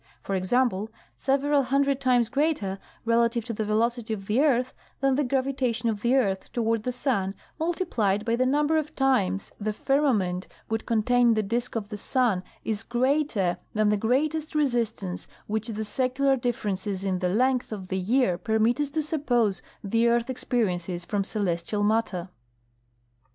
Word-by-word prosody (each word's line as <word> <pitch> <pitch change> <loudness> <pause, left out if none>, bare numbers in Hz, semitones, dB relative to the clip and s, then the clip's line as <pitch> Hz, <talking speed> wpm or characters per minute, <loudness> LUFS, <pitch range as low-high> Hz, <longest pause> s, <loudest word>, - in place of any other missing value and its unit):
For 195 - -3
example, 210 +2 +1 0.3
several 280 +1 +2
hundred 275 +1 +1
times 245 -3 +3
greater 270 -8 0 0.3
relative 230 0 +2
to 235 - -4
the 220 - -2
velocity 225 +1 0
of 195 -2 -10
the 215 +7 +2
earth 255 -4 +2 0.3
than 270 0 +2
the 290 +3 +2
gravitation 260 -3 0
of 210 -2 -2
the 240 +3 +3
earth 195 -8 0
toward 230 -2 0
the 250 - -2
sun 230 -7 -1 0.2
multiplied 245 - 0
by 230 0 +2
the 255 +1 +2
number 295 +3 +2
of 305 -1 -3
times 200 -8 +1
the 215 0 -2
firmament 210 -10 +1 0.2
would 225 0 -2
contain 235 +1 +3
the 215 - +1
dise 235 +4 -1
of 215 -3 -3
the 210 - -5
sun 230 -4 +1 0.2
is 215 -1 -1
greater 240 -6 +1 0.2
than 215 0 +3
the 210 - +3
greatest 300 +9 0
resistance 230 -10 -1 0.2
which 220 +1 -2
the 220 -1 -3
secular 260 +5 +1
differences 210 -6 -2
in 190 -2 0
the 180 -1 0
length 250 +6 +1
of 190 -4 -6
the 190 - -1
year 190 -2 +2
permit 220 +6 +1
us 290 - -1
to 310 +2 -1
suppose 245 - +1 0.2
the 230 +4 +2
earth 235 +2 +2
experiences 180 -8 -2
from 205 +1 -1
celestial 200 0 -1
matter. 205 -4 0
230 Hz, 160 wpm, -26 LUFS, 205-260 Hz, 0.3 s, times